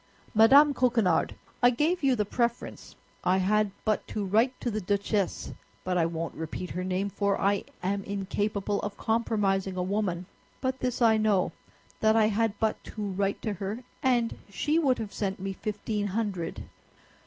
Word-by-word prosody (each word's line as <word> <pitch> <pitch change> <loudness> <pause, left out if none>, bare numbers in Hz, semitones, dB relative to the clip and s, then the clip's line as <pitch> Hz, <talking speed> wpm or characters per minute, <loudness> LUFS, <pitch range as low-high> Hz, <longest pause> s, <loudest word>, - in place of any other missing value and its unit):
"Madame 275 +7 +7
Coquenard, 230 -11 +2 0.3
I 245 - +7
gave 310 +9 +1
you 265 -2 +4
the 210 -3 0
preference. 235 +3 -2 0.3
I 185 +1 +3
had 210 +2 +2 0.2
but 215 -1 0
to 210 -2 -3
write 225 +7 +2
to 240 - -1
the 215 0 -2
Duchesse—but 200 -2 -2
I 165 -2 +3
won't 165 0 -4
repeat 160 +3 -5
her 180 - -3
name, 185 +2 -1
for 200 +1 0
I 200 0 +1 0.2
am 195 +2 -1
incapable 200 +1 -2
of 205 -1 -5
compromising 200 -4 0
a 180 - 0
woman; 185 -2 -1 0.3
but 260 0 -2
this 250 -1 -1
I 220 -1 +5
know, 210 -4 +2 0.5
that 220 0 +4
I 215 -1 +4
had 220 -1 0
but 220 -1 -1
to 210 -2 -4
write 195 +1 -1
to 215 - -1
her 200 +5 -5 0.2
and 240 -3 +2
she 300 - +1
would 270 -6 +2
have 215 -3 -5
sent 195 -2 -2
me 195 +1 -3
fifteen 210 0 -3
hundred." 200 -4 -3
205 Hz, 165 wpm, -28 LUFS, 195-230 Hz, 0.5 s, Madame